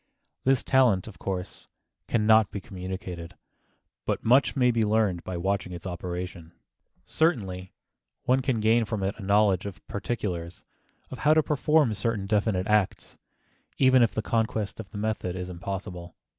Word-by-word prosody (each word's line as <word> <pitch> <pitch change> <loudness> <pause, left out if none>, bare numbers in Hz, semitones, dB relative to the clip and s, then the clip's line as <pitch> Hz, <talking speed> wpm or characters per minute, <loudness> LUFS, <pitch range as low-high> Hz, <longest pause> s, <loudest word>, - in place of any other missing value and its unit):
This 135 -2 +3
talent, 125 -9 +3
of - - -11
course, 95 -2 -5 0.4
can 110 -2 +1
not 110 -1 +5
be 100 - -5
communicated, 90 -3 -7 0.7
but - - -2
much 130 +6 +4
may 125 -2 +4
be 115 -1 0
learned 105 -5 +1
by 95 -1 -4
watching 95 0 -1
its 85 0 -8
operation. 90 -2 -5 0.5
Certainly 95 - 0 0.5
one 130 +1 +3
can 130 -3 0
gain 115 +2 +4
from 105 -2 -3
it 95 +2 0
a - - -7
knowledge 100 -1 +3
of 100 - -10
particulars, 95 -6 -4 0.5
of - - -7
how 155 +1 +4
to 155 - +4
perform 150 -3 +2
certain 105 0 -1
definite 100 -2 +1
acts, 105 -2 0 0.6
even 130 -1 +5
if 115 - +2
the 110 - -1
conquest 110 -3 -1
of 110 - -7
the 105 - -8
method 105 -4 -2
is 90 0 -5
impossible. 90 -1 -6
105 Hz, 155 wpm, -27 LUFS, 90-115 Hz, 0.7 s, not